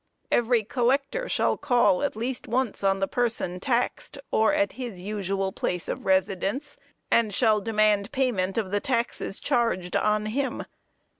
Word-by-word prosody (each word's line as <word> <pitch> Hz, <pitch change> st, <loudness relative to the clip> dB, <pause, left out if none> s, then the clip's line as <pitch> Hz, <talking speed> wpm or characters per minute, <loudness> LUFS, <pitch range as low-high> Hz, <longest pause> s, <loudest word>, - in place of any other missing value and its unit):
"Every 240 Hz, -1 st, +3 dB
collector 275 Hz, -, 0 dB
shall -, -, +1 dB
call 240 Hz, -9 st, +3 dB
at 285 Hz, -, -1 dB
least 240 Hz, +4 st, -4 dB
once 245 Hz, -3 st, -1 dB
on 195 Hz, 0 st, +3 dB
the 195 Hz, 0 st, 0 dB
person 230 Hz, -7 st, -1 dB
taxed, 245 Hz, +5 st, -1 dB
or 220 Hz, +6 st, +3 dB
at 300 Hz, 0 st, +1 dB
his 240 Hz, -8 st, -6 dB
usual 195 Hz, 0 st, -2 dB
place 180 Hz, -2 st, -3 dB
of -, -, -5 dB
residence, 195 Hz, +8 st, 0 dB, 0.4 s
and 225 Hz, -2 st, +3 dB
shall 215 Hz, 0 st, +3 dB
demand 210 Hz, -1 st, +2 dB
payment 230 Hz, -9 st, 0 dB
of 205 Hz, -4 st, -1 dB
the 205 Hz, -, +1 dB
taxes 235 Hz, -4 st, -1 dB
charged 230 Hz, -9 st, 0 dB
on 210 Hz, 0 st, +1 dB
him. 260 Hz, +5 st, -2 dB
220 Hz, 150 wpm, -26 LUFS, 195-250 Hz, 0.4 s, Every